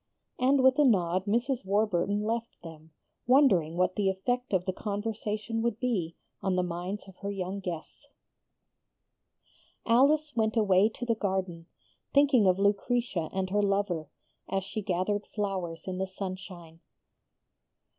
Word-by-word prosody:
And 260 +1 +3
with 260 +2 +5
a - - +7
nod 185 -7 +2
Mrs. 240 +4 0
Warburton 200 0 +1
left 230 +1 -3
them, 160 -1 -11 0.4
wondering 190 - +4
what 185 0 +1
the 200 -2 +1
effect 245 +7 -2
of 185 -2 +1
the 185 - -1
conversation 215 +2 -3
would 230 -1 -1
be 190 -10 -1 0.3
on 190 -2 0
the 180 - +1
minds 180 +4 -5
of 190 - -14
her 200 - -5
young 195 0 -4
guests. 175 -4 -7 1.8
Alice 290 +5 +3
went 220 0 +1
away 200 -1 +4
to 240 +2 -7
the 235 - +2
garden, 190 -5 -3 0.5
thinking 275 -7 +5
of 185 0 +4
Lucretia 200 -3 0
and 190 -1 -2
her 205 +1 +2
lover, 195 -6 0 0.4
as 195 0 -1
she 205 +3 -4
gathered 200 +2 -1
flowers 190 -6 -4
in 185 0 -3
the 190 - -1
sunshine. 185 -3 -7
200 Hz, 145 wpm, -29 LUFS, 185-225 Hz, 1.8 s, a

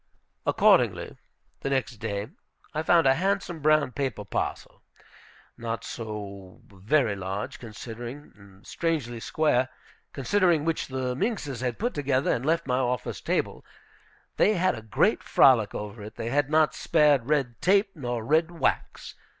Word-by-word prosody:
Accordingly, - - +3 0.4
the - - -3
next 130 -3 -1
day, 105 0 -4 0.4
I 155 - -1
found 165 0 +4
a 135 - +6
handsome 185 +1 -1
brown 155 -2 +3
paper 125 -7 -3
parcel, - - -4 0.8
not 115 -1 -4
so 100 -4 -7
very 110 +4 +1
large, 100 +7 -5
considering, 120 +4 -8
and 100 -1 -18
strangely 145 -9 -2
square, 130 -1 +1 0.4
considering, 170 +1 +2
which 165 -1 -1
the 130 -1 -2
minxes 155 - -2
had 125 -2 -2
put 240 +3 -1
together 140 -2 +1
and 120 - -2
left 165 +2 +1
on 125 - +1
my - - +1
office 125 -1 -2
table. - - -1 0.7
They 215 - +4
had 185 +1 +2
a 110 - -7
great 110 -2 +1
frolic 115 -6 +4
over 105 +1 -6
it. 105 +1 -9
They 115 0 -4
had 145 0 +1
not 155 0 +3
spared 145 -6 +3
red 135 -6 0
tape 195 +2 +3
nor 120 -6 -4
red 160 +5 +3
wax. 165 -6 -2
130 Hz, 150 wpm, -26 LUFS, 115-155 Hz, 0.8 s, a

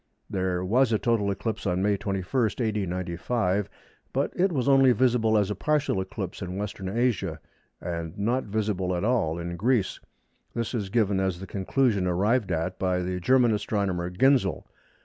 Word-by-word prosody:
There 95 -1 -1
was 120 +5 +3
a 110 - +3
total 110 -3 +1
eclipse 110 +2 -3
on 90 0 0
May 105 0 +3
21, 95 -2 -3 0.3
A.D. 105 -4 0
95, 95 +3 -1 0.4
but - - -1
it 190 +1 +2
was 135 -5 -1
only 135 -2 +6
visible 115 -2 +3
as 105 -1 +1
a - - -2
partial 145 -3 0
eclipse 95 0 -6
in 90 -1 -4
Western 100 -2 -4
Asia 100 -7 0 0.4
and 85 -2 -5
not 120 +6 0
visible 100 -4 -1
at 85 - -2
all 105 -9 +1
in 85 0 -4
Greece. 115 -1 +1 0.6
This 115 +1 -2
is 105 -5 -2
given 100 -3 +2
as 95 -2 -1
the 95 - -7
conclusion 100 0 0
arrived 100 +4 +1
at 85 +2 -2
by 90 -1 0
the 90 0 -2
German 125 +3 +4
astronomer 100 -4 -1
Ginzel. 100 - +2
100 Hz, 170 wpm, -26 LUFS, 90-115 Hz, 0.6 s, only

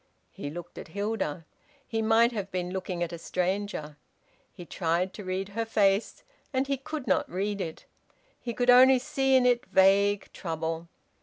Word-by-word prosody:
He 145 - -6
looked 175 +3 -8
at - - -9
Hilda; 195 -4 -3 0.4
he 225 -2 -2
might 225 +2 +4
have 205 -4 -4
been 180 -1 -3
looking 185 -2 -3
at 170 0 -4
a 170 - -6
stranger. 180 -4 -2 0.5
He 175 - -11
tried 175 +2 -1
to 210 - -8
read 190 +1 -3
her 225 +3 -2
face, 205 -2 +1 0.3
and 265 -1 +1
he 275 0 -1
could 280 +1 -6
not 190 -5 +1
read 200 +2 -2
it. 165 -3 -6 0.5
He 235 -2 -5
could 245 0 +4
only 260 +1 +8
see 270 +1 +1
in 255 -1 +5
it 245 0 +3
vague 200 +1 +3
trouble. 165 -1 -4
200 Hz, 170 wpm, -28 LUFS, 175-230 Hz, 0.5 s, only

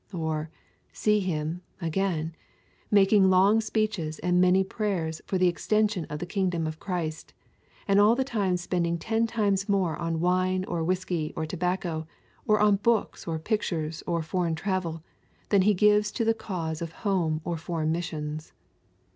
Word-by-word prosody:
Or, 160 -3 -2 0.4
see 210 0 +2
him, 165 -2 -2 0.2
again, 165 -2 -1 0.6
making 200 -1 +5
long 195 +4 +5
speeches 210 -8 -1
and 180 +2 +2
many 185 +1 +5
prayers 190 -6 -2
for 190 - 0
the 180 0 +4
extension 210 +1 +1
of 150 - -5
the 175 - -4
kingdom 180 -3 -1
of 155 0 -5
Christ, 170 -5 -4 0.5
and 200 0 +4
all 215 +3 +6
the 265 - +1
time 205 -8 0
spending 175 -1 -1
ten 225 +6 0
times 205 -3 0
more 190 -5 +1
on 165 -1 -2
wine 185 +2 +1
or 170 -3 -2
whisky 175 -3 -1
or 160 - -2
tobacco, 170 -1 -2 0.4
or 215 0 +4
on 210 -1 +4
books 225 -2 0
or 165 -1 -1
pictures 160 -4 -2
or 170 -2 0
foreign 170 0 -1
travel, 170 -2 -2 0.5
than 200 -2 +4
he 205 +2 +4
gives 210 +2 +4
to 230 - -1
the 225 - +4
cause 170 -8 -4
of 165 -1 -4
home 170 -6 +1
or 170 0 -2
foreign 160 -1 -2
missions. 155 -2 -4
180 Hz, 160 wpm, -27 LUFS, 160-200 Hz, 0.6 s, all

